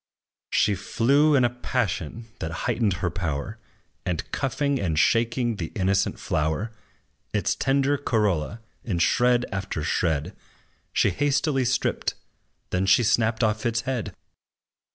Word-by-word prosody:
She 105 - +3
flew 140 - +3
in 130 - +4
a - - +3
passion 115 - -2
that 80 - -3 0.2
heightened 115 -4 +1
her 85 - 0
power, 85 +3 -3 0.4
And, 90 -3 -3
cuffing 140 +1 0
and 80 -5 -1
shaking 115 +3 +2
the 80 -4 -4
innocent 95 -1 +1
flower, 80 +9 -1 0.6
Its - - +1
tender 140 +1 +1
corolla 105 - 0 0.2
in 100 -7 -2
shred 120 +8 +3
after 95 -5 -3
shred 80 +2 0 0.6
She 100 - +2
hastily 140 - +1
stripped, 130 - 0 0.6
then 90 +1 0
she 110 +5 +5
snapped 110 +1 +2
off 110 0 +1
its 120 -1 0
head. 125 -6 -3
110 Hz, 130 wpm, -25 LUFS, 95-125 Hz, 0.6 s, she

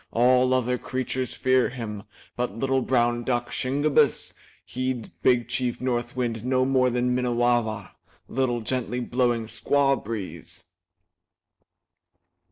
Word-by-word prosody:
All 125 +2 +4
other 125 -1 0
creatures 130 0 -3
fear 130 -1 +2
him. 110 -5 -6 0.3
But 120 -4 -3
little 135 +1 +1
brown 120 -2 +1
duck, 120 -1 -1
Shingebiss, 140 +3 +1 0.3
heeds 130 -2 -3
Big 125 -2 +1
Chief 125 -2 -1
North 120 -1 -2
Wind 115 -3 -2
no 130 0 +2
more 130 -1 +3
than 125 0 0
Minnewawa, 120 -4 0 0.4
little, 125 -2 0
gently 125 +1 -2
blowing 120 -2 0
squaw 135 +4 +1
breeze." 95 -7 -6
125 Hz, 115 wpm, -25 LUFS, 120-130 Hz, 0.4 s, All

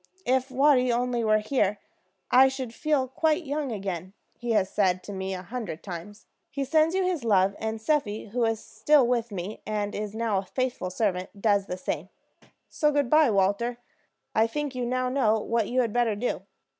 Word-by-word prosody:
'If 260 +1 +1
Watty 260 -1 +4
only 240 0 0
were 215 -1 +4
here, 215 -2 0 0.5
I 260 +1 +7
should 265 -3 -4
feel 295 -3 0
quite 315 +6 +1
young 285 -1 -2
again,' 190 -3 -4 0.2
he 240 -1 -2
has 200 -3 +3
said 185 -2 +1
to 205 - -7
me 190 0 -3
a 180 - -7
hundred 210 -6 -6
times. 195 +3 -8 0.2
He 280 -1 -3
sends 315 +5 +3
you 380 - +2
his 360 -7 -1
love; 200 -3 +3
and 220 0 -3
Seppi, 220 -5 -1
who 240 +3 -1
is 225 -1 +1
still 265 +6 +3
with 235 -2 0
me, 195 +2 -5
and 210 -1 -2
is 210 0 -4
now 220 -3 0
a - - -5
faithful 250 -4 -2
servant, 185 0 -2
does 200 -2 +2
the 180 - -4
same. 185 -1 -4 0.6
So 300 -2 +1
good 285 -4 0
by, 310 -3 +6
Walter. 205 +4 +1 0.6
I 220 0 +3
think 290 +3 -3
you 250 -1 -2
now 255 +1 0
know 225 -5 +2
what 230 0 0
you 255 +1 +2
had 230 -4 -1
better 240 -3 +2
do." 235 +5 -2
230 Hz, 195 wpm, -27 LUFS, 205-260 Hz, 0.6 s, I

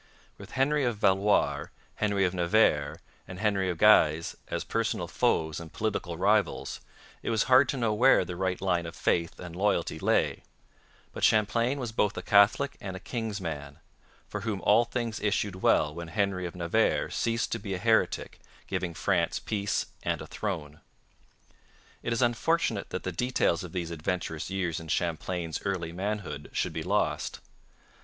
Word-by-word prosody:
With - - -11
Henry 140 +2 +2
of 120 -4 0
Valois, 100 +1 +2 0.3
Henry 100 -2 +1
of 90 - 0
Navarre, 85 -5 +2 0.3
and 90 -1 -8
Henry 100 -2 +1
of 85 - -2
Guise 80 -6 +5
as - - -3
personal - - -1
foes 80 -1 0
and 85 -1 -9
political 95 -6 -2
rivals, 100 0 +1 0.4
it - - -3
was 110 -2 +2
hard 130 +1 +5
to 140 - -1
know 115 -3 +1
where 120 -2 +5
the 90 0 -6
right 95 0 -1
line 90 -3 0
of 85 - -8
faith 85 -1 0
and 85 -2 -8
loyalty 105 +3 0
lay; - - +1 0.7
but - - -6
Champlain 115 +5 +3
was 120 -4 -3
both 105 -2 0
a - - -4
Catholic 105 +7 +4
and 95 -2 -5
a - - -6
king's 110 0 -4
man, 75 -5 -6 0.5
for 105 - -5
whom 105 -2 -2
all 105 +6 +5
things 115 -2 -3
issued 100 -2 -1
well 75 -1 +3
when 85 +1 -7
Henry 95 0 -1
of 85 - -9
Navarre 85 -1 +1
ceased 115 0 -1
to 115 - -1
be 100 -2 -4
a - - -3
heretic, 110 +3 +1 0.3
giving 85 -2 -3
France - - +1
peace 100 -1 -1 0.2
and - - -1
a - - -7
throne. 80 -8 -5 1.2
It - - -3
is 115 +2 +1
unfortunate 120 -2 +1
that 90 - -4
the 95 - -2
details 125 -4 +1
of 90 - -8
these 85 -2 -3
adventurous 80 0 -3
years 95 -4 -2
in 80 - -10
Champlain's 85 0 -2
early 90 -4 -2
manhood 95 -5 -4
should - - -1
be - - -3
lost. - - -1
95 Hz, 170 wpm, -28 LUFS, 85-110 Hz, 1.2 s, Guise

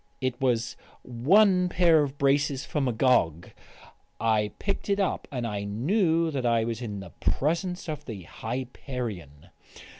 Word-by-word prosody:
It 130 -2 -2
was 120 -3 +1 0.3
one 180 - +4
pair 170 -3 +4
of 140 -1 -3
braces 140 0 +1
for 150 - -2
Magog. 120 - +2 0.7
I 110 -2 +1
picked 200 0 -3
it 200 0 +2
up, 195 -3 -1
and 125 -4 -3
I 105 -3 -3
knew 165 - +1
that 135 -4 -2
I 115 -2 +2
was 115 0 -3
in 105 -4 -5
the 95 - -10
presence 175 +5 -1
of 150 -2 -5
the 105 -6 -7
Hyperion. 115 - -6
130 Hz, 145 wpm, -27 LUFS, 115-160 Hz, 0.7 s, one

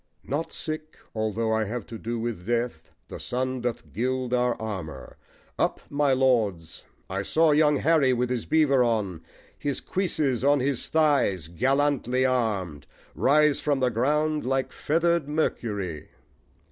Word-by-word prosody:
Not 145 +5 -3
sick 155 0 -5 0.2
although 110 0 -1
I 110 0 +1
have 115 +1 -4
to 115 - -8
do 115 +1 -3
with 115 -5 -4
death 120 -8 -2 0.2
The - - -8
sun 130 0 -2
doth 120 -1 -4
gild 125 +1 -1
our 125 -1 +1
armour: 85 -12 -6 0.4
Up, - - +1
my 145 -1 +2
Lords! 110 -11 +1 0.2
I 95 +1 -2
saw 160 +9 +3
young 150 -1 +4
Harry 155 -4 +3
with 125 0 0
his 125 -3 -2
beaver 140 -5 +4
on, 105 -8 -1 0.4
His 145 -2 -2
cuisses 155 -10 -1
on 145 +1 +4
his 130 -1 -1
thighs, 140 - +2
gallantly 130 - +1
arm'd, 100 - -1 0.3
Rise 150 +1 +3
from 145 -2 0
the 130 -1 +2
ground 150 +6 +1
like 135 +1 -1
feather'd 165 -1 0
Mercury. 105 - -2
125 Hz, 145 wpm, -26 LUFS, 110-145 Hz, 0.4 s, young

